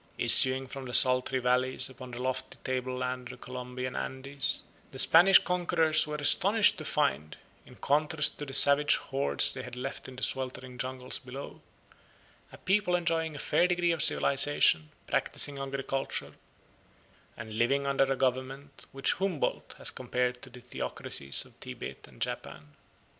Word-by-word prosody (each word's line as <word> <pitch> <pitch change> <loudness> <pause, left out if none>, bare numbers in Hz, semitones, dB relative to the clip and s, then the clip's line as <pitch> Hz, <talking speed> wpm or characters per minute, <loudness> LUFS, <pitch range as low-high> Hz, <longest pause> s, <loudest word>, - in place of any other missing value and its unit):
Issuing 130 0 +7
from 135 +1 -9
the 125 -2 0
sultry 130 +1 +4
valleys 125 +1 0
upon 130 -1 -12
the 120 0 -9
lofty 130 0 -4
tableland 125 -1 -4
of 125 - -11
the - - -13
Colombian 125 0 -7
Andes, 140 +1 -1 0.3
the 130 - -11
Spanish 175 +7 +6
conquerors 170 -4 +1
were 150 - -5
astonished 200 +8 +4
to - - -8
find, 75 +3 -2 0.3
in - - -16
contrast 150 +1 0
to 145 - -6
the 135 - -9
savage 145 +1 +8
hordes 135 +1 +1
they 135 - -8
had 125 -1 -10
left 130 +2 -7
in 130 - -11
the 130 - -3
sweltering 130 -1 -3
jungles 130 0 -4
below, 130 +2 -10 0.9
a - - -13
people 190 -2 0
enjoying 165 -3 -2
a - - -7
fair 175 - +1
degree 175 -1 0
of 165 -3 -2
civilisation, 135 - +2 0.2
practising 140 -1 0
agriculture, 135 0 -5 1.0
and 110 0 -8
living 140 +4 0
under 140 0 +1
a - - +1
government 130 +2 -4
which 135 0 -1
Humboldt 190 -5 -4
has - - -2
compared 125 0 -3
to - - -10
the 125 0 -14
theocracies 70 - -4
of - - -22
Tibet - - -9
and - - -19
Japan. 75 -1 -6
130 Hz, 155 wpm, -28 LUFS, 125-145 Hz, 1.0 s, savage